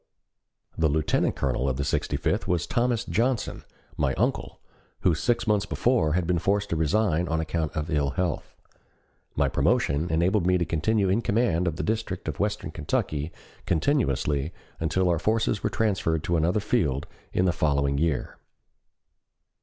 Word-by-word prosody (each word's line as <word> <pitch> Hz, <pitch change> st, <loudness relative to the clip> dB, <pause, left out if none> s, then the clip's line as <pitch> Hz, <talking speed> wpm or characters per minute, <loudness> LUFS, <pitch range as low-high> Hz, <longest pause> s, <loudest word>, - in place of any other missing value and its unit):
The 80 Hz, -1 st, +3 dB
Lieutenant 75 Hz, +1 st, +1 dB
Colonel 65 Hz, 0 st, 0 dB
of 65 Hz, -, -2 dB
the 70 Hz, -, -1 dB
Sixty -, -, -1 dB
fifth -, -, -1 dB
was 90 Hz, -2 st, +1 dB
Thomas 120 Hz, -1 st, 0 dB
Johnson, 120 Hz, +2 st, -1 dB, 0.3 s
my 70 Hz, -2 st, +1 dB
uncle, -, -, -1 dB, 0.4 s
who 90 Hz, -, +3 dB
six 115 Hz, +10 st, 0 dB
months 105 Hz, -2 st, +1 dB
before 100 Hz, -13 st, +1 dB
had 90 Hz, 0 st, +1 dB
been 85 Hz, 0 st, +1 dB
forced 100 Hz, +3 st, 0 dB
to -, -, +1 dB
resign 85 Hz, +1 st, +1 dB
on 80 Hz, 0 st, 0 dB
account 80 Hz, -1 st, -2 dB
of 80 Hz, +2 st, -3 dB
ill 70 Hz, -2 st, +1 dB
health. 85 Hz, +3 st, -3 dB, 0.8 s
My -, -, +2 dB
promotion 75 Hz, +5 st, +1 dB
enabled 85 Hz, +4 st, +2 dB
me 90 Hz, 0 st, +4 dB
to 85 Hz, -, 0 dB
continue 100 Hz, +6 st, +1 dB
in 100 Hz, +5 st, +2 dB
command 100 Hz, -5 st, +1 dB
of 80 Hz, -, -1 dB
the -, -, -3 dB
district 110 Hz, -4 st, -2 dB
of -, -, -4 dB
western 105 Hz, -5 st, -1 dB
Kentucky 75 Hz, -1 st, -2 dB, 0.4 s
continuously 80 Hz, -, +1 dB, 0.3 s
until 85 Hz, +3 st, +1 dB
our 85 Hz, -2 st, +2 dB
forces 110 Hz, +1 st, +1 dB
were -, -, 0 dB
transferred 95 Hz, -8 st, 0 dB
to 85 Hz, -, 0 dB
another 85 Hz, +6 st, +2 dB
field 80 Hz, -, 0 dB, 0.3 s
in 90 Hz, -, +1 dB
the 90 Hz, -, +2 dB
following 70 Hz, -3 st, +1 dB
year. 80 Hz, -4 st, -1 dB
85 Hz, 160 wpm, -26 LUFS, 75-105 Hz, 0.8 s, me